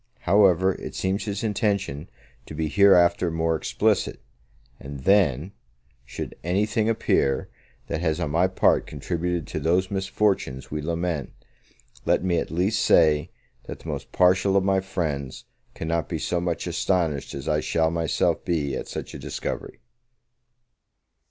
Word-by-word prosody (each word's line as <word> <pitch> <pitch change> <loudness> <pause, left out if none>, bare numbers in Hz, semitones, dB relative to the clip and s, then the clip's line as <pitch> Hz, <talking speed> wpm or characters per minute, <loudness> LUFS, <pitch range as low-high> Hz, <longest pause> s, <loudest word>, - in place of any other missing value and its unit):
However, 95 -1 +4
it - - -8
seems 95 +2 -1
his 100 -1 -3
intention 100 - -1 0.4
to 75 - -8
be 80 0 -1
hereafter 90 -2 +5
more 80 0 0
explicit; 80 - 0 0.6
and 70 0 -8
then, 90 -3 +3 0.5
should - - -6
anything 105 +5 +1
appear, 70 -11 +1 0.4
that 80 - -3
has 80 -1 0
on 80 -4 -2
my 85 +4 +3
part 95 - +2
contributed 85 +2 -3
to - - -4
those 90 +5 +1
misfortunes 95 -8 -1
we 75 0 -3
lament, 85 -1 -2 0.7
let - - +2
me 90 -2 +1
at - - -4
least 95 +6 0
say, 80 0 +4 0.4
that - - -7
the - - -8
most - - -5
partial 95 +2 +3
of 95 - +2
my 95 0 +2
friends 80 -8 -4 0.3
cannot 80 -2 -2
be - - -2
so 90 -1 -1
much 85 -2 -2
astonished 80 -9 -1
as 70 +2 -7
I 75 -1 +2
shall 80 +1 +1
myself 85 -2 0
be 75 -6 -1
at - - -5
such - - -6
a - - -7
discovery. - - -5
85 Hz, 145 wpm, -25 LUFS, 75-95 Hz, 0.7 s, hereafter